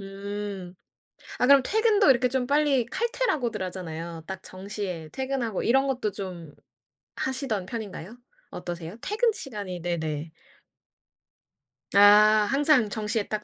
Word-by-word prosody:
음. 195 -1 -6 0.6
아 250 - +2
그럼 280 0 +7
퇴근도 430 - +3
이렇게 250 -1 +4
좀 250 0 -1
빨리 285 -4 +2
칼퇴라고들 310 - -1
하잖아요. 170 -3 -6
딱 190 -1 -6
정시에 185 -4 -6
퇴근하고 260 -6 -2
이런 270 +3 +3
것도 250 -5 -1
좀 180 -6 -7 0.6
하시던 255 -8 -2
편인가요? 215 -1 -7 0.3
어떠세요? 175 +1 -6
퇴근 445 +3 +1
시간이 205 - -6
네네. 160 -2 -3 1.7
아 - - +7 0.5
항상 275 -4 +3
정시에 215 0 -2
딱 215 -1 -3
210 Hz, 270 characters per minute, -26 LUFS, 185-265 Hz, 1.7 s, 그럼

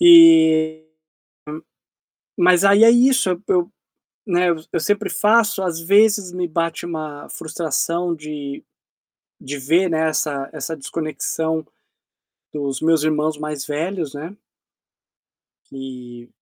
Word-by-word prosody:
Eh, 160 - +6 1.6
hum, 175 - +2
mas 180 +1 +4
aí 200 +3 +6
é 230 - +8
isso, 250 -3 +3 0.2
eu, 360 -3 +1 0.6
né, 180 -3 +1 0.2
eu 170 - -1
sempre 205 +5 -1
faço, 210 -2 +2
às 170 -3 -3
vezes 200 +1 +3
me 180 0 -3
bate 165 +1 -3
uma 155 -3 -7
frustração 170 +2 -2
de 150 -2 -8 0.8
de 145 +2 -6
ver, 165 +7 +1
né, 160 0 +1
essa 145 -3 -2
essa 160 - -5
desconexão 160 +1 -4 0.9
dos 140 -3 -4
meus 160 -1 +2
irmãos 155 0 0
mais 150 -2 -5
velhos, 155 0 -4
né. 160 +7 -8 1.4
E 125 -3 -10
160 Hz, 115 wpm, -20 LUFS, 150-190 Hz, 1.6 s, é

